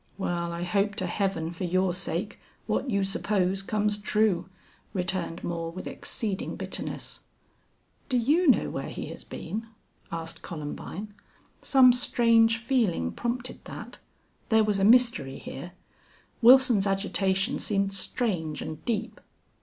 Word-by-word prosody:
"Well, 175 -3 -2
I 170 +1 -4
hope 200 +3 +1
to 185 - 0
Heaven 175 -3 -1
for 175 +2 -6
your 185 +1 +1
sake 185 +2 -3 0.3
what 265 - -1
you 200 -4 +1
suppose 195 -1 0
comes 210 +1 0
true," 205 -4 +1 0.5
returned 180 -2 -2
Moore, 165 -1 -3
with 185 +2 -8
exceeding 210 -6 -3
bitterness. - - -4 0.9
"Do 255 - +2
you 300 +9 +3
know 265 - +4
where - - -4
he - - -6
has - - -8
been?" 225 +2 -6 0.4
asked 165 0 -5
Columbine. 170 +6 -6 0.5
Some 255 -2 +6
strange 230 -2 +4
feeling 230 - 0
prompted 245 +1 -4
that. - - -9 0.5
There 220 -1 +5
was 210 -2 +1
a - - +1
mystery 235 - +4
here. 175 +6 -8 0.7
Wilson's 245 -4 +6
agitation 195 -1 +1
seemed 195 -1 0
strange 185 - -1
and 155 0 -7
deep. 230 -1 -2
195 Hz, 130 wpm, -27 LUFS, 175-230 Hz, 0.9 s, Some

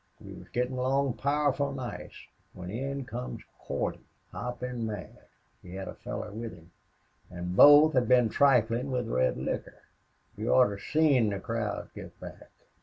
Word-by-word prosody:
We - - -11
was - - -12
gettin' 125 +1 -2
along 135 +1 +1
powerful 140 -1 +1
nice 130 -3 -7 0.3
when 90 0 -8
in 135 +4 -4
comes 125 0 -6 0.2
Cordy, - - -3 0.3
hoppin' 125 -1 -5
mad. 105 -7 -8 0.3
He 90 +1 -10
had 95 0 -6
a - - -6
feller 105 - -6
with 115 +1 -6
him. 85 +1 -18 0.6
An' 90 0 -5
both 145 +8 +8
had 125 -2 +2
been 125 -2 +5
triflin' 125 0 +2
with 125 -3 -1
red 65 - +1
liquor. - - -5 0.5
You 110 +3 0
oughter 105 -6 +4
seen 140 -5 +3
the 100 -1 -3
crowd 115 -2 -4
get - - -11
back. - - -11
125 Hz, 155 wpm, -29 LUFS, 105-135 Hz, 0.6 s, both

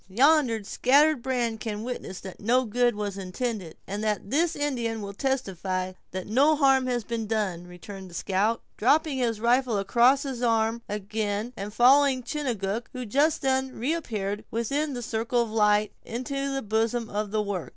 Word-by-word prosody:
"Yonder 250 0 +3
scattered 280 +7 +3
brand 240 -3 -1
can 215 -1 -4
witness 240 -6 -5
that 190 -2 -9
no 250 +5 +2
good 240 +1 +1
was 205 -2 -4
intended, 190 -2 -4
and 205 +2 -4 0.3
this 325 +4 +2
Indian 240 -6 -1
will 200 -1 -6
testify 190 -7 -2 0.2
that 185 0 -5
no 275 +8 +4
harm 270 -3 +3
has 245 -2 -1
been 225 0 -3
done," 195 -6 -2
returned 190 +2 -10
the 175 - -12
scout, 200 +6 0
dropping 290 +4 +2
his 230 -3 0
rifle 240 0 +2
across 240 +7 +4
his 265 -4 -5
arm 225 -1 +1
again, 210 +2 -3
and 200 0 -5
following 260 +3 +5
Chingachgook, 235 -6 -3
who 255 -1 -5
just 290 +8 +2
then 265 -1 0
reappeared 220 -7 -2
within 275 +6 -1
the 245 - -4
circle 230 +2 0
of 225 - -7
light, 210 -1 +3
into 275 +4 -3
the 270 0 -2
bosom 225 +2 0
of 210 0 -3
the 215 +1 0
work. 185 -10 -4
230 Hz, 165 wpm, -26 LUFS, 205-260 Hz, 0.3 s, following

